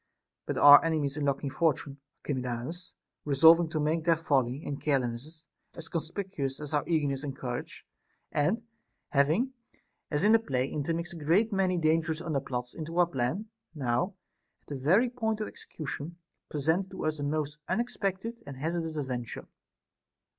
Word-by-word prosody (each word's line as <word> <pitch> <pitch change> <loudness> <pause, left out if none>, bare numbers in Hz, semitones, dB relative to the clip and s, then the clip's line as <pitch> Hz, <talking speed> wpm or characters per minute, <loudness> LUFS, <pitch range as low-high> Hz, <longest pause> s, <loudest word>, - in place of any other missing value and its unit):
But - - -2
our 145 0 +10
enemies' 155 -4 0
unlucky 140 -1 0
Fortune, 140 -1 0 0.3
Archiclamus, 130 +6 -4 0.3
resolving 160 +4 +6
to 155 - -2
make 155 +2 +1
their 165 0 +4
folly 140 -3 +1
and 140 - -4
carelessness 140 +3 -2 0.3
as 165 0 -8
conspicuous 160 -4 -3
as 150 0 -6
our 145 -1 +2
eagerness 145 -4 0
and 135 -2 -5
courage, 125 -2 -5 0.5
and 180 +10 +1 0.5
having, 160 - +2 0.6
as 150 +3 0
in 210 +2 +6
a 225 - +7
play, 130 - -1
intermixed 165 +5 -2
a - - -8
great 200 +9 +3
many 190 -2 +2
dangerous 160 0 +1
underplots 135 -6 -3
into 165 +1 -6
our 175 - +6
plan, 170 - -2 0.3
now, 130 +7 0 0.5
at - - -22
the 145 - -3
very 175 - +4
point 225 -3 -2
of 215 - -2
its - - -10
execution, 155 +2 -6 0.3
presented 160 +6 0
to - - -5
us 155 -1 -1
a - - -2
most 150 0 -2
unexpected 230 -1 -2
and 140 -2 -7
hazardous 165 +2 -2
adven 125 -5 -3
ture. - - -8
155 Hz, 155 wpm, -29 LUFS, 140-175 Hz, 0.6 s, our